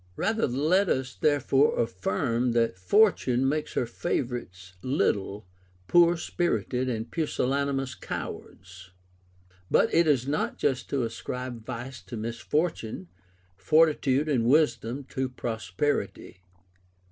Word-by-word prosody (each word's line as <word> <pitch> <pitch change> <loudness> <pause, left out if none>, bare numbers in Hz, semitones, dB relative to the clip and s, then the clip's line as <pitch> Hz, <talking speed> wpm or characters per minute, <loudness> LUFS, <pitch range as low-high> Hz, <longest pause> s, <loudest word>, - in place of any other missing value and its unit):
4. - - -7
Rather 225 0 +1
let 155 +10 +2
us 130 -1 -1
therefore 145 -1 +2
affirm 115 +4 0
that 115 -4 +2
Fortune 130 - +3
makes 150 +2 -1
her - - +1
favorites 115 - -4
little, 105 -6 -1 0.4
poor 175 - +5
spirited, 135 -7 -1
and 115 -1 -4
pusillanimous 140 -3 -1
cowards. 95 -1 -8 0.8
But - - +3
it 170 0 +4
is 135 -4 +2
not 150 +2 -1
just 130 -2 -1
to 135 -3 0
ascribe 120 +1 -5
vice 125 0 -7
to 95 +5 -8
misfortune, 115 - -2 0.5
fortitude 150 - +3
and 130 -6 +1
wisdom 130 -2 +2
to 130 0 -2
prosperity. 115 -3 -3
125 Hz, 110 wpm, -27 LUFS, 115-145 Hz, 0.8 s, poor